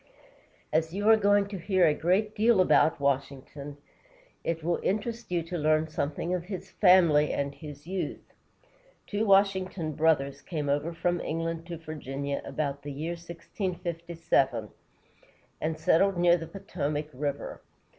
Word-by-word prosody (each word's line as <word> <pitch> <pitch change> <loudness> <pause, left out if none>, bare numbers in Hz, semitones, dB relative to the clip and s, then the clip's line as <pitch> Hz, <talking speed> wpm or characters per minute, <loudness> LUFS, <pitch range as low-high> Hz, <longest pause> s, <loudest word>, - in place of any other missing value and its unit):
As 160 +2 +1
you 205 +1 -1
are 225 - +9
going 205 -1 +3
to 200 -2 -5
hear 185 0 +3
a 155 - +4
great 190 +8 +1
deal 220 -1 +3
about 170 -4 +4
Washington, 140 +1 -2 0.7
it 165 -1 -2
will 170 +1 0
interest 225 +4 -2
you 170 -2 +1
to 170 +1 -4
learn 155 +1 +2
something 155 +3 -2
of 175 -1 -2
his 190 -1 -7
family 170 -6 +5
and 140 0 -2
his 145 -1 -10
youth. 185 +1 -5 0.7
Two 210 +1 -1
Washington 190 -4 +2
brothers 145 -3 +1
came 150 -5 -3
over 145 +4 0
from 175 +1 -1
England 165 +1 -3
to 170 -1 -5
Virginia 140 -3 -4
about 140 -2 -3
the 145 +1 -6
year 155 +5 -4
1657, 170 - -2 0.9
and 155 0 -1
settled 175 +4 +3
near 175 0 +5
the 165 -2 -5
Potomac 155 -5 -4
River. 140 +1 -4
165 Hz, 145 wpm, -28 LUFS, 150-185 Hz, 0.9 s, are